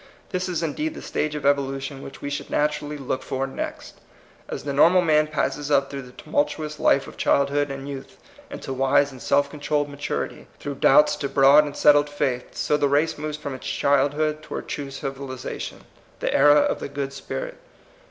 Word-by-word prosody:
This 185 -1 -2
is 170 -2 -2
indeed 305 - -2
the - - -8
stage 150 0 -2
of 145 -2 -5
evolution 135 -1 0
which 135 - -10
we 145 - -3
should 145 - -4
natu 150 0 0
rally 150 0 -6
look 130 -2 -3
for 135 0 -2
next. 135 - -6 0.5
As - - -5
the 140 - -3
normal 175 +6 +5
man 155 -2 +3
passeu 150 -1 -2
up 140 -1 +2
through 140 -1 -5
the 125 -1 -12
tumultuous 150 +2 -2
life 135 - +3
of - - -12
childhood 140 +1 +2
and 135 0 -6
youth 140 +7 -8 0.3
into 285 - -6
wise 135 +2 +3
and 130 -2 -12
self 140 0 +2
controlled 145 0 -1
maturity, 145 0 -4
through 140 -2 -5
doubts 150 +2 +6
to 140 -2 -3
broad 140 +2 +6
and 145 - -6
settled 145 0 +5
faith, 130 -4 -2
so 150 - +1
the 145 -1 +2
race 145 +2 +1
moves 150 0 -4
from 145 -2 -5
its 130 - -7
childhood 145 +2 +1
toward - - -6
true 145 -1 -4
civiliza 135 -1 -6
tion - - -7 0.2
— - - -31
the - - -1
era 145 +1 +6
of - - 0
the - - -5
good 140 -1 -4
spirit. - - -6
145 Hz, 200 wpm, -24 LUFS, 135-150 Hz, 0.5 s, doubts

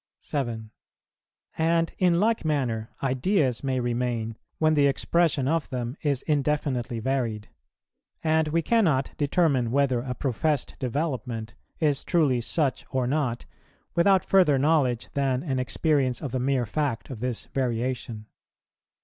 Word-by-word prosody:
7. 115 -6 -4 0.9
And, 165 +1 +2
in 175 -2 +3
like 225 +3 +2
manner, 125 -8 -1
ideas 135 - +1
may 130 -1 0
remain, 120 -2 -1 0.2
when 155 0 +3
the 145 -2 +4
expression 145 0 +1
of 160 0 0
them 125 -1 -3
is 140 -4 0
indefinitely 140 -5 0
varied; 115 -4 -2 0.7
and 160 -1 +2
we 165 +2 0
cannot 160 - +2
determine 145 -5 +2
whether 130 -1 +2
a 125 +1 -4
professed 140 +3 -1
development 125 -4 -3 0.3
is 150 -4 +1
truly 145 -8 +2
such 140 +2 0
or 130 -1 0
not, 130 -3 -1 0.5
without 190 +2 +4
further 180 -8 +4
knowledge 135 -4 +2
than 135 -1 0
an 135 -5 -1
experience 130 -1 +1
of 140 -6 -5
the 130 - -1
mere 130 -1 +1
fact 135 +1 -2
of 125 - -6
this 125 -1 -3
variation. 120 -3 -2
135 Hz, 130 wpm, -26 LUFS, 125-155 Hz, 0.9 s, the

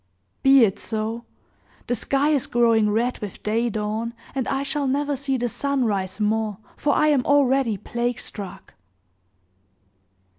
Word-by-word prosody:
"Be 270 -2 +7
it 195 -1 -2
so! 225 +1 -4 0.6
The - - -1
sky 275 +5 +1
is 290 -4 +1
growing 230 -3 +3
red 235 +4 0
with 205 -3 -8
day 230 +3 +1
dawn, 220 +2 -3 0.2
and 265 -3 -2
I 270 0 -1
shall 280 0 -1
never 285 +2 0
see 270 0 -1
the 245 0 -1
sun 280 +1 -1
rise 195 -2 -2
more, 215 -1 0 0.2
for 290 - +1
I 305 - +4
am 280 -4 +3
already 270 -5 +3
plague 240 +3 -2
struck!" 195 -4 -7
240 Hz, 150 wpm, -23 LUFS, 215-275 Hz, 0.6 s, Be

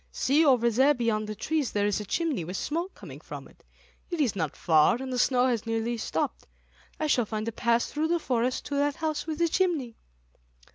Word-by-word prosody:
See, 290 +5 +2
over 245 -5 +4
there 270 +6 +4
beyond 225 -3 0
the 215 - -5
trees, 295 +5 -1
there 205 -1 +1
is 205 0 +1
a 210 - -5
chimney 295 - -1
with 180 +4 -5
smoke 340 +5 -3
coming - - -10
from - - -9
it. - - -23 0.5
It 345 -2 -3
is 260 -9 +1
not 160 -6 -2
far, 160 +6 +4
and 260 -1 -5
the 250 - -1
snow 250 0 +3
has 235 -3 0
nearly 225 +1 -1
stopped, 220 - -3 0.5
I 310 - 0
shall 250 -7 +2
find 215 0 -3
a - - -1
path 235 +1 +1
through 305 +2 -2
the 345 +1 +2
forest 255 -5 -1
to 285 - -3
that 285 0 +1
house 310 -1 -3
with 315 -1 -3
the 340 +1 +2
chimney." 320 -10 0
250 Hz, 220 wpm, -27 LUFS, 225-300 Hz, 0.5 s, over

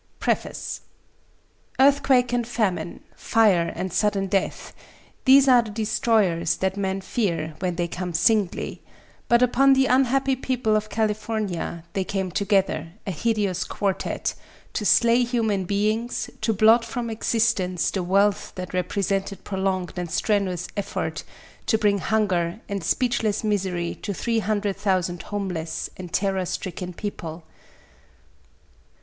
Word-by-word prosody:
D. - - -40 0.2
PREFACE - - -2 1.0
Earthquake 265 -3 +4
and 240 -2 0
famine, 215 -7 -1
fire 200 -7 +3
and 185 -2 -4
sudden 205 -2 +1
death 195 0 -2 0.5
these 275 0 +7
are 250 -2 +7
the 230 - -8
destroyers 210 -6 +1
that 190 0 -1
men 195 -1 -2
fear 170 -7 -2
when 180 -2 -1
they 175 0 -1
come 180 +1 -4
singly; 195 +2 +1 0.5
but 235 +1 +4
upon 270 +2 +5
the 265 0 +4
unhappy 265 +1 +2
people 250 -4 0
of 215 0 -1
California 210 -6 -2
they 195 - 0
came 190 -1 -3
together, 195 -3 0
a 195 - -2
hideous 200 -1 0
quartette, 195 -2 -2 0.4
to 210 - -2
slay 235 +1 +5
human 220 -6 0
beings, 215 +5 -1
to 220 +1 +1
blot 220 +3 +5
from 235 0 -4
existence 215 -5 +1
the 190 - -2
wealth 195 +3 +1
that 185 -1 -6
represented 195 +2 -1
prolonged 190 -2 -2
and 175 -1 -3
strenuous 185 -1 0
effort, 205 - -3 0.4
to 220 - +3
bring 205 -2 +2
hunger 190 -4 0
and 200 -3 -4
speechless 230 0 0
misery 190 -5 -1
to 200 - -3
three 230 +3 0
hundred 205 -2 -1
thousand 185 -3 0
homeless 185 -6 -4
and 180 -2 -8
terror 190 +1 0
stricken 180 0 -4
people. 170 -4 -6
200 Hz, 130 wpm, -24 LUFS, 185-225 Hz, 1.0 s, these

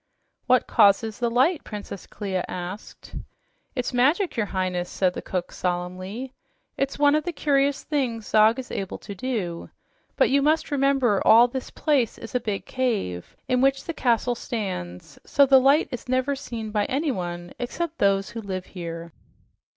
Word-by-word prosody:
"What 255 -1 +4
causes 215 0 +3
the 240 -1 +1
light?" 265 +8 +2
Princess 205 -3 -8
Clia 190 -3 -3
asked. 180 +3 -8 0.6
"It's 250 -1 -2
magic, 295 +10 +2
your 220 -4 0
Highness," 185 -2 -2
said 185 -2 +1
the - - -5
cook 180 -2 -4
solemnly. 185 +8 -4 0.4
"It's 275 0 -2
one 290 0 +4
of 305 0 +2
the 350 - -2
curious 280 -2 +1
things 245 -7 -2
Zog 215 +3 +4
is 260 -1 -7
able 195 -2 -4
to 200 - -9
do. 195 -6 -4 0.5
But - - +3
you 280 +1 +4
must 310 +2 +1
remember 270 -7 +2
all 235 +2 +7
this 255 +1 -5
place 280 -7 0
is 225 - -10
a 250 - +2
big 210 -4 -3
cave 215 - -2
in 250 0 +2
which 270 0 +2
the 335 - -4
castle 245 -3 +1
stands, 185 - -5
so 280 - +4
the 265 -1 +7
light 280 +4 +4
is 250 0 -7
never 260 +2 +1
seen 230 -5 -6
by 210 -1 +1
anyone 180 - -3
except 325 +7 -4
those 195 +2 +2
who 230 -1 -6
live 185 -3 -5
here." 170 -2 -7
235 Hz, 165 wpm, -25 LUFS, 195-270 Hz, 0.6 s, all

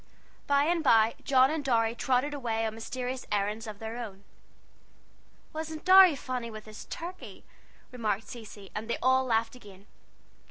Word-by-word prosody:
By 280 0 +4
and 335 +1 +1
by 225 -4 +5
John 265 0 +4
and 315 -2 -2
Dorry 230 -4 +2
trotted 255 +4 0
away 230 -5 -2
on 220 - -2
mysterious 250 +3 -5
errands 210 +2 -1
of 210 -2 -7
their 225 +2 -6
own. 200 -4 -8 1.3
"Wasn't 315 0 -6
Dorry 375 -3 +8
funny 255 -3 -4
with 215 -1 -9
his 215 0 -10
turkey?" 355 +2 -8 0.5
remarked 220 -4 -2
Cecy; 210 -4 -10
and 220 +2 -5
they - - 0
all 260 0 +4
laughed 225 -1 0
again. 200 -5 -15
240 Hz, 155 wpm, -29 LUFS, 220-275 Hz, 1.3 s, Dorry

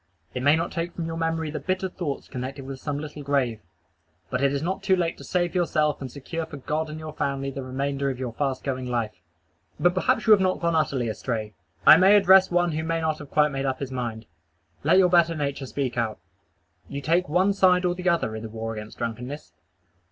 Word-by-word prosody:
It 125 - -3
may 145 +3 +5
not 165 +1 -2
take 170 +1 -3
from 170 - -3
your 165 0 -4
memory 165 -1 -1
the - - -4
bitter 190 0 -1
thoughts 170 -6 -5
connected 130 +1 -6
with 135 -1 -7
some 145 0 -3
little 150 0 -7
grave: 135 -6 0 0.7
but 125 0 -1
it 140 0 +3
is 140 +1 -2
not 190 +3 -2
too 190 -1 +3
late 170 -2 -1
to - - -9
save 175 -2 0
yourself 155 -5 +1
and 130 -2 -5
secure 160 +3 -5
for 145 - -8
God 155 +3 -2
and 155 - -6
your 155 -1 -7
family 135 -2 -2
the 135 - -5
remainder 140 +2 -2
of 130 - -3
your 125 -3 -4
fast 135 0 -2
going 130 -2 -3
life. 110 -7 -2 0.6
But 175 0 +4
perhaps 185 - +1
you 220 - +4
have 210 - +8
not 185 0 +2
utterly 155 -7 +1
gone 110 - -1
astray. 110 -2 -4 0.3
I - - +10
may 190 +4 +6
address 190 -1 +6
one 175 -1 +2
who 160 +1 -2
may 165 0 -1
not 160 -1 -1
have 145 - -10
quite 150 -1 +3
made 135 0 -2
up 130 -1 -1
his 135 -2 -5
mind. 120 -3 -4 0.6
Let 160 +5 +4
your 185 -2 +5
better 170 -1 +4
nature 140 -2 -3
speak 125 -3 -2
out. 110 -2 -1 0.7
You 140 - -4
take 170 +3 +1
one 185 +5 +3
side 185 -2 +4
or 175 - +2
the 180 +1 -1
other 165 -10 0
in 110 - -5
the 110 - -6
war 115 0 -4
against 110 0 -8
drunkenness. 125 +5 -5
150 Hz, 230 wpm, -25 LUFS, 130-170 Hz, 0.7 s, I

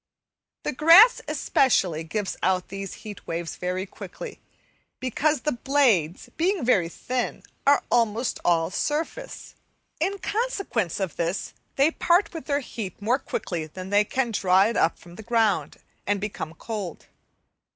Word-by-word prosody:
The - - -2
grass, 335 - +7
especially, 255 - +2
gives 195 +5 -3
out 185 -1 +1
these 195 0 -6
heat 205 -2 -9
waves 165 0 -3
very 180 +1 -2
quickly, - - -9 0.6
because 295 +4 0
the 300 - 0
blades, 235 - +1
being 355 -2 +1
very 185 -9 +3
thin, 250 +7 -3 0.2
are 285 0 +5
almost 230 0 +1
all 165 -1 +2
surface. 320 - -3 0.5
In 385 +6 0
consequence 395 - -2
of 190 -6 -3
this 170 +3 -2 0.2
they 280 +4 +4
part 350 +4 +2
with 325 - -7
their 285 -1 0
heat 220 -7 -7
more 235 +6 +1
quickly 165 - -4
than 185 +4 -8
they 205 +1 +5
can 240 +2 -1
draw 190 -2 +4
it 225 +2 0
up 165 - +2
from 175 0 -15
the - - -7
ground, 225 -3 +1 0.3
and 205 0 +1
become 190 -6 -5
cold. 205 -4 -6
220 Hz, 145 wpm, -25 LUFS, 185-285 Hz, 0.6 s, grass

